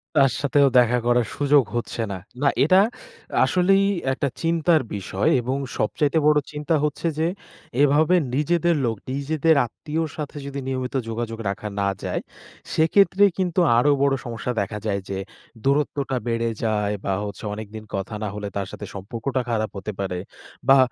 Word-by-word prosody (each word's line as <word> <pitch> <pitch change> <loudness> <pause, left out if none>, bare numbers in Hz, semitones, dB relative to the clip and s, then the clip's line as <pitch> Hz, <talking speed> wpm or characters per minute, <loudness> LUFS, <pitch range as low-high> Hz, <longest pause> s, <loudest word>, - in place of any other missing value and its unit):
তার 135 -2 +5
সাথেও 145 0 +4
দেখা 125 0 +3
করার 120 -1 +3
সুযোগ 145 -1 +4
হচ্ছে 120 0 -3
না। 95 - -3 0.2
না 140 - +3 0.2
এটা 185 +6 +6 0.6
আসলেই 195 +2 +3 0.3
একটা 140 - -1
চিন্তার 165 -1 +3
বিষয় 95 0 -1
এবং 130 +3 -2 0.2
সবচাইতে 145 +8 +1
বড় 150 0 +5
চিন্তা 150 +2 -1
হচ্ছে 150 +3 -1
যে 160 - +2 0.5
এভাবে 150 +5 +4 0.2
নিজেদের 170 +3 +2
লোক, 115 -1 0 0.2
নিজেদের 155 +3 +2
আত্মীয়র 155 +7 -3
সাথে 150 -1 -5
যদি 140 0 -5
নিয়মিত 130 0 -3
যোগাযোগ 115 0 -4
রাখা 105 +2 -4
না 100 - +2
যায়, - - -2 0.5
সেক্ষেত্রে 195 +5 +4
কিন্তু 180 -1 0 0.2
আরো 145 +4 +4
বড় 140 -1 +3
সমস্যা 120 +1 -3
দেখা 105 +2 -3
যায় 100 -2 0
যে, 95 - -2 0.5
দূরত্বটা 140 -1 +1
বেড়ে 115 0 0
যায় 105 -2 +1
বা 95 - +1
হচ্ছে 100 - -7
অনেকদিন 110 0 -7
কথা 100 +3 -4
না - - -1
হলে 105 -1 -4
তার 100 -1 -2
সাথে - - -7
সম্পর্কটা 115 +6 -3
খারাপ 110 -2 0
হতে 105 +2 -4
পারে। 95 -2 -2 0.5
বা 135 0 +8
135 Hz, 160 wpm, -23 LUFS, 110-150 Hz, 0.6 s, বা